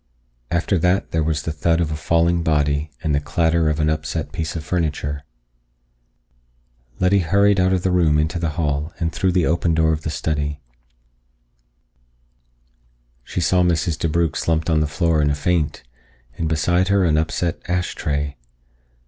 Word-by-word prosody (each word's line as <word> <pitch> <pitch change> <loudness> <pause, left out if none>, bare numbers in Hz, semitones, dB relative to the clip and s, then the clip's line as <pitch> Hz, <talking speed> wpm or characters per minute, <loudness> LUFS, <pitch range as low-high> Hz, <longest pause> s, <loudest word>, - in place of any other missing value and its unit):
After 85 +2 0
that 90 +4 +1
there 80 - +1
was 75 -1 -1
the 80 - -2
thud 80 +2 +1
of 80 -3 0
a - - -2
falling 85 +2 +1
body 75 -1 +1
and 75 - 0
the 70 - +2
clatter 80 +1 +1
of 75 0 -1
an 75 - +2
upset 75 0 -2
piece 80 0 -4
of 80 - -4
furniture. 75 -4 -2 1.8
Letty 95 +2 +3
hurried 100 +3 +3
out 90 0 +3
of 95 -1 0
the 95 - +1
room 85 -4 +3
into 80 +3 0
the 80 -1 -3
hall 75 0 -1
and 80 -2 -1
through 90 +2 0
the 90 -3 +2
open 85 0 +1
door 80 0 +3
of 80 - -3
the 80 - -4
study. 75 -2 -2 2.6
She 90 - -4
saw 90 +2 +3
Mrs. 85 -1 +1
DeBrugh 80 -1 0
slumped 80 +1 0
on 80 - +3
the 75 - +1
floor 75 +2 +1
in 75 - +2
a 70 - 0
faint, 80 0 -1 0.5
and 80 +2 -2
beside 85 +4 +1
her 100 -1 +3
an 80 -3 +2
upset 80 +2 -1
ash 90 0 -1
tray. 70 -1 -3
80 Hz, 170 wpm, -21 LUFS, 75-85 Hz, 2.6 s, Letty